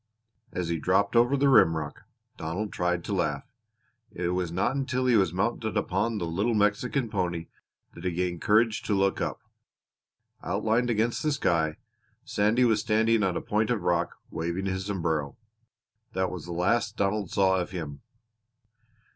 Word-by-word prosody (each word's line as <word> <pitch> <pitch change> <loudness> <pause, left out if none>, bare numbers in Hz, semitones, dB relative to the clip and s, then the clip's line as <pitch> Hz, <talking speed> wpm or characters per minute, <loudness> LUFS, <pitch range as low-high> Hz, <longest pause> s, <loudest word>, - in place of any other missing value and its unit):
As 90 -2 -3
he 85 -1 -1
dropped 100 +6 +1
over 120 +4 +4
the 140 +1 +3
rimrock, 80 - +3 0.3
Donald 90 +7 -4
tried 90 -1 0
to 100 - -3
laugh. 75 -6 -1 0.7
It 85 0 -2
was 90 -1 -1
not 95 +9 0
until 130 -2 -1
he 125 -2 +4
was 95 -6 +3
mounted 110 +4 -1
upon 105 +5 0
the 90 - -2
little 100 +8 0
Mexican 115 +5 +1
pony 90 -5 -2 0.4
that 85 - -11
he 90 - +1
gained 90 -1 -2
courage 110 +1 +3
to 105 - -1
look 95 0 +1
up. - - -3 1.0
Outlined 110 +6 0
against 115 +1 +1
the 155 - +1
sky 80 - +1 0.5
Sandy 110 +5 +2
was 110 -3 +3
standing 110 +1 +2
on 95 -3 +1
a - - -3
point 105 +1 0
of 120 -6 0
rock, 85 -1 0 0.2
waving 85 +4 -3
his 95 0 -2
sombrero. 80 -7 -2 0.8
That 95 0 0
was 90 -4 -6
the - - -6
last 110 +6 +1
Donald 100 -1 0
saw 95 -1 +3
of 90 - -3
him. 80 -6 -6
95 Hz, 165 wpm, -27 LUFS, 85-110 Hz, 1.0 s, over